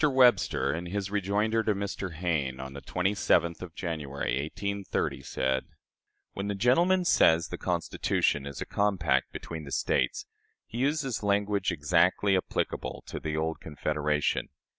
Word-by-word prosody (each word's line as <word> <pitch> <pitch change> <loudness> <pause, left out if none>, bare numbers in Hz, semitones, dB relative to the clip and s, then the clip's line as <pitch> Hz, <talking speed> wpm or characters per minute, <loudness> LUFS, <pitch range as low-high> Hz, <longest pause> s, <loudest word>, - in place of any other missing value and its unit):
Webster, 130 - +4
in 85 +3 -4
his 100 +1 -3
rejoinder 105 +3 +1
to 110 -2 +1
Mr. 100 -3 -4
Hayne, 75 -6 -1
on 65 0 -6
the 70 - -8
27th 90 -3 +1
of 90 -3 -8
January, 70 -6 -2
1830, 100 +1 -2
said: 65 0 -1 0.7
"When 100 +1 -4
the 100 - -1
gentleman 175 - +3
says 80 - +4
the - - -6
Constitution 70 -1 0
is 70 -2 -7
a - - -2
compact 90 -10 +1
between 80 -2 -6
the 70 - -9
States, - - 0 0.4
he 115 - -6
uses 135 -2 0
language 100 -1 +1
exactly 90 +5 +3
applicable 95 - -2
to - - -6
the 80 0 -3
old 80 +1 -1
Confederation. 75 0 -1
90 Hz, 140 wpm, -29 LUFS, 75-105 Hz, 0.7 s, Webster